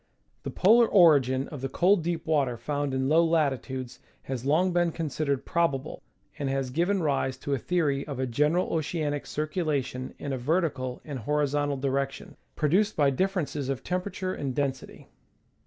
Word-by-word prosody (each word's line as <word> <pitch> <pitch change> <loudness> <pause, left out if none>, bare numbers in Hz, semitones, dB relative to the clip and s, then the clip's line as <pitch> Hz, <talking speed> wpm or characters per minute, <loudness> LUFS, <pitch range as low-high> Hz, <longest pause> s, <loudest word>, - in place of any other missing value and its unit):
The - - -5
polar 230 +5 +5
origin 140 - +4
of 145 -4 -8
the 135 - -3
cold 180 +6 +3
deep 170 -1 -2
water 140 -6 +1
found 145 +2 -2
in 130 0 0
low 160 +4 +5
latitudes 135 -6 -1 0.2
has 130 -1 -4
long 175 +5 +3
been 175 -1 +2
considered 150 -4 -2
probable, 155 -4 -1 0.4
and 140 -2 -1
has 135 -1 -2
given 175 +6 +1
rise 135 -3 0
to 140 +1 -3
a 135 - 0
theory 145 -3 0
of 140 -3 -5
a 130 - 0
general 150 +8 +1
oceanic 155 -2 -2
circulation 150 -5 -2
in 140 - -4
a 130 - -3
vertical 135 -3 -1
and 145 -4 -5
horizontal 145 +2 0
direction, 135 0 -2 0.2
produced 190 +8 +2
by 145 -2 +3
diffei'ences 155 -4 -1
of 135 -4 -3
temperature 185 +1 -3
and 135 -3 -4
density. 135 -2 -3
145 Hz, 160 wpm, -27 LUFS, 135-165 Hz, 0.4 s, polar